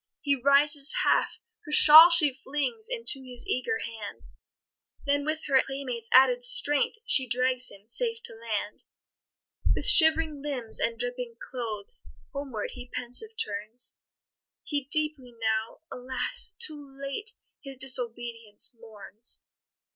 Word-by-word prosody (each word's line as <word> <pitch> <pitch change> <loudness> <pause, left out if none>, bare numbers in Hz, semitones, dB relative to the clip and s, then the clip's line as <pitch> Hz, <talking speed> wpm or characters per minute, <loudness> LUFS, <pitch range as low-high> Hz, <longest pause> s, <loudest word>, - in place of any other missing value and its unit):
He 285 -3 0
rises 280 +2 +2
half - - 0 0.2
her 300 - -11
shawl 315 +3 +10
she 325 -5 +5
flings 295 - -4
Into 460 - +2
his 245 -2 -6
eager 445 - -2
hand, 220 -3 -9 0.8
Then, 285 0 -1
with 310 +1 -3
her 270 -2 +3
playmate's 255 -4 -6
added 485 - +4
strength, 445 - +2
She 265 - +4
drags 255 +1 -1
him 200 +1 -17
safe 460 - +1
to - - -1
land. 220 -2 -6 0.9
With - - -3
shivering 320 -2 +5
limbs 265 -6 -3
and 230 0 -2
dripping 245 -1 -5
clothes, 250 - -7 0.3
Homeward 270 -7 -6
he 250 -1 -11
pensive 255 - -1
turns; 215 +4 -5 0.6
He 285 -3 -4
deeply 295 -4 -3
now, 220 +2 -3
alas! 250 0 -2
too 290 -10 -6
late, 280 +11 -6 0.3
His 270 -1 -10
disobedience 235 -3 -1
mourns. 220 +1 -3
265 Hz, 125 wpm, -26 LUFS, 235-300 Hz, 0.9 s, shawl